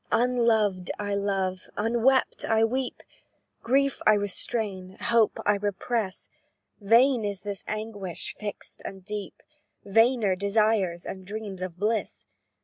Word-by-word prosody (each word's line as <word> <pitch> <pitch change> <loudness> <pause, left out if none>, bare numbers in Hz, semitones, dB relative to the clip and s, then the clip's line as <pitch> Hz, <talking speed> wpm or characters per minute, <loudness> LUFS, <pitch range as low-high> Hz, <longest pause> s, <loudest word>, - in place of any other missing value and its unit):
"Unloved 225 -6 +2
I 205 -1 -2
love; 195 -2 -1
unwept 235 +5 +2
I 225 0 +3
weep; 255 +3 -1 0.6
Grief 275 +3 +1
I 215 - +8
restrain 200 -2 -3
hope 230 -2 +3
I 205 0 +3
repress: 205 0 -2 0.5
Vain 235 +4 +4
is 200 -2 -3
this 200 -2 -4
anguish 210 -5 -4
fixed 210 -1 -6
and 190 -1 -8
deep; 210 -2 -6 0.4
Vainer, 225 -1 +3
desires 200 -3 +1
and 190 -1 -6
dreams 200 -1 -6
of 180 -2 -5
bliss. 215 +3 -1
210 Hz, 120 wpm, -27 LUFS, 195-225 Hz, 0.6 s, I